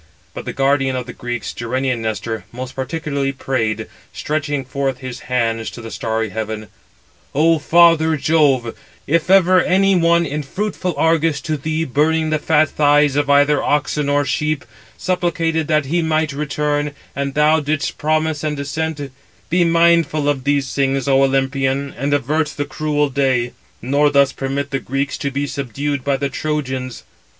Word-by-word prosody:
But - - -7
the - - -3
guardian 135 -1 +1
of 125 -1 -3
the 125 - -8
Greeks, 120 -1 -5
Gerenian 125 +1 -2
Nestor, 110 0 -3
most 130 +2 -7
particularly 140 0 -2
prayed, 115 -5 -2 0.3
stretching 145 -2 -2
forth 135 0 -2
his 130 -2 -7
hands 115 -2 0
to - - -10
the 115 -1 -8
starry 110 -1 -2
heaven: 110 0 -5 0.7
"O 160 +2 +4
father 160 0 +4
Jove, 140 -6 +2 0.3
if 165 +4 +1
ever 185 -1 +6
any 195 +1 +3
one 170 0 +3
in 150 +1 -3
fruitful 185 +3 -3
Argos, 160 -1 +2
to 155 - -2
thee 155 +3 -2
burning 155 +3 +1
the 155 - +1
fat 155 0 +3
thighs 145 -1 +3
of 145 -1 +1
either 145 +1 +4
oxen 145 0 0
or 145 0 +2
sheep, 155 0 -1 0.3
supplicated 165 -3 -1
that 155 -2 +2
he 170 +6 0
might 155 -2 0
return, 145 0 -1 0.2
and 140 -1 -3
thou 150 +1 +4
didst 145 -2 -2
promise 155 0 0
and 150 -2 -2
assent; 145 0 -3 0.4
be 175 +1 +4
mindful 165 -3 +3
of 140 -3 0
these 140 -2 0
things, 135 0 0
O 135 -1 +4
Olympian, 135 0 0
and 140 +3 -2
avert 145 +3 +1
the 145 - -1
cruel 150 0 0
day; 130 -3 0 0.3
nor 140 +4 +3
thus 140 -1 +3
permit 140 +1 -3
the 135 - 0
Greeks 135 +2 -2
to 140 - -1
be 140 +1 -2
subdued 140 +1 -3
by 140 0 +1
the 140 0 -2
Trojans." 130 -4 -3
145 Hz, 160 wpm, -19 LUFS, 135-155 Hz, 0.7 s, ever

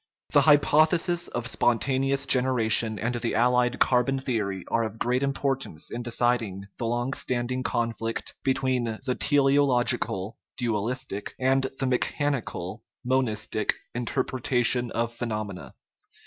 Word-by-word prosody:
The 145 - +6
hypothesis 155 +4 +3
of 120 -1 -4
spontaneous 135 +3 +1
generation 120 -4 +3
and 115 +3 -2
the 120 -1 -2
allied 125 +1 +2
carbon 125 +1 +2
theory 105 -8 -2
are 115 - +1
of 110 0 -5
great 125 +3 0
importance 135 - -2
in 120 - -4
deciding 120 -5 0 0.2
the 115 - -1
long 120 +3 -1
standing 125 0 -1
conflict 115 -2 -2
between 130 -2 0
the 115 +3 -4
Ideological 130 -7 +2 0.2
(du 120 -3 -1
alistic) 115 0 -4
and 130 +1 +2
the 135 - -1
mechanical 135 +1 -2 0.2
(monistic) 110 -4 0 0.2
interpretation 125 0 0
of 115 +1 -2
phenomena. 110 -5 -5
125 Hz, 120 wpm, -26 LUFS, 115-135 Hz, 0.2 s, The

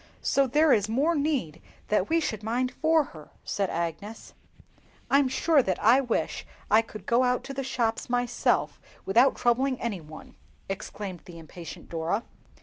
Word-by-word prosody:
"So 275 -1 +2
there 300 +3 +4
is 210 -1 +1
more 280 +9 +2
need 280 - -1 0.3
that 210 -2 +1
we 330 - +3
should 215 -10 -3
mind 245 +4 -1
for 320 0 +2
her," 155 -2 -12
said 195 -2 -1
Agnes. 170 +6 -5 0.8
"I'm 275 -1 +5
sure 285 +3 +3
that 190 -6 -1
I 245 +5 +5
wish 245 -4 -2
that - - -26 0.3
I 220 - +7
could 220 -1 -11
go 250 +1 +3
to 275 - -8
the 270 0 -3
shops 240 -3 -1
myself 245 0 0 0.2
without 235 +8 +4
troubling, 255 +2 +1
any 210 -7 -3
one!" 155 0 -12 0.3
exclaimed 195 -1 -6
the 175 -2 -11
impatient 165 0 -10
Dora. 170 +7 -2
235 Hz, 160 wpm, -27 LUFS, 195-270 Hz, 0.8 s, I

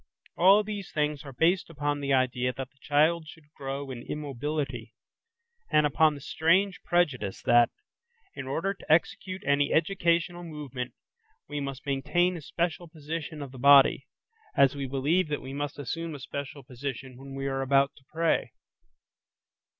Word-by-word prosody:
All 195 +4 +6
these 205 -2 -6
things 150 -1 -1
are 135 - -7
based 170 +8 +2
upon 145 -2 -2
the 140 -1 -2
idea 125 -1 +2
that 130 +2 -6
the 135 - -34
child 155 +3 +2
should 150 -1 -15
grow 135 0 -5
in 120 -2 -6
immobility, 140 -4 -4 0.7
and 150 0 +4
upon 150 +1 +3
the 140 - -10
strange 180 +7 +2
prejudice 140 - 0
that, 120 0 +5 0.6
in 130 - -7
order 165 +9 -1
to 190 - -7
execute 185 +3 +1
any 140 0 +2
educational 170 0 +1
movement, 145 -6 -6 0.5
we 145 - -4
must 135 -1 -5
maintain 175 +6 +1
a 170 - -6
special 170 +3 -2
position 155 -1 -6
of 135 - -9
the 130 - -11
body;–as 140 - +4
we 140 -1 -3
believe 145 +7 +1
that 150 -1 -2
we 130 +1 -8
must 145 +1 -4
assume 160 +4 -4
a - - -8
special 140 +1 -6
position 130 -1 -6
when 135 +1 -10
we 135 0 -4
are 135 -1 -1
about 135 +1 +3
to 140 - -20
pray. 165 0 0
145 Hz, 160 wpm, -28 LUFS, 135-165 Hz, 0.7 s, All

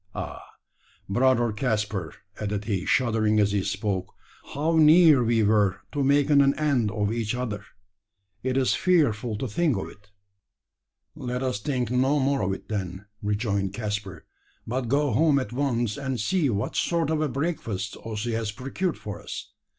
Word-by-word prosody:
Ah! - - -5 0.7
brother 120 +2 +2
Caspar," 105 - -2 0.2
added 105 -1 -3
he, 100 -5 -2
shuddering 110 -4 +2
as 100 -1 +3
he 100 -1 +1
spoke, 95 -1 -2 0.4
"how 155 +4 +1
near 155 -3 +7
we 115 -1 +2
were 105 -2 +2
to 145 - -1
making 140 +1 +4
an 140 0 +3
end 140 -8 +1
of 105 0 -1
each 115 -1 -2
other! 110 -5 -4 0.8
It's 130 0 +1
fearful 125 - +2
to 130 - -3
think 145 +3 +1
of 95 - -4
it!" 105 +2 -18 1.0
"Let 125 +1 -4
us 125 -5 -1
think 125 0 -2
no 130 +4 +2
more 135 -1 +1
of 95 0 0
it - - -8
then," 95 -2 -4 0.2
rejoined 100 -2 -1
Caspar; 105 -3 -4 0.4
"but 125 +1 -2
go 140 +3 +2
home 155 -2 +3
at 120 -4 -2
once 120 -5 0
and 135 -3 -3
see 150 - +1
what 100 -2 -2
sort 165 -3 +1
of 155 -1 0
a 155 - 0
breakfast 120 - -3
Ossy 115 +1 -4
has 115 -2 -2
procured 135 - -3
for 105 0 -7
us. - - -7
115 Hz, 160 wpm, -26 LUFS, 105-140 Hz, 1.0 s, near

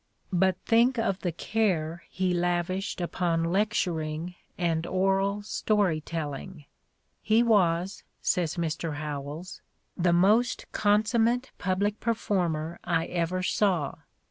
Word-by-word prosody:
But 185 +1 +3
think 240 +3 +4
of 210 -4 0
the 175 - -1
care 170 -3 -1
'\ - - -36
he 185 -1 0
lavished 175 +2 -1
upon 170 -1 0
lecturing 175 -4 -1 0.2
and 165 -1 0
oral 195 +2 +1
story 205 -6 +1
telling! 155 +1 -5 0.6
He 220 +2 +3
'was, 190 -4 +2 0.2
says 175 -3 0
Mr. 165 -2 -2
Howells, 150 +3 -6 0.3
"the 175 0 +2
most 205 +8 +3
consummate 225 +4 +2
public 200 +3 0
performer 170 -8 -1
I 165 -2 +1
ever 180 +1 -1
saw. 185 -7 +1
180 Hz, 115 wpm, -28 LUFS, 165-205 Hz, 0.6 s, think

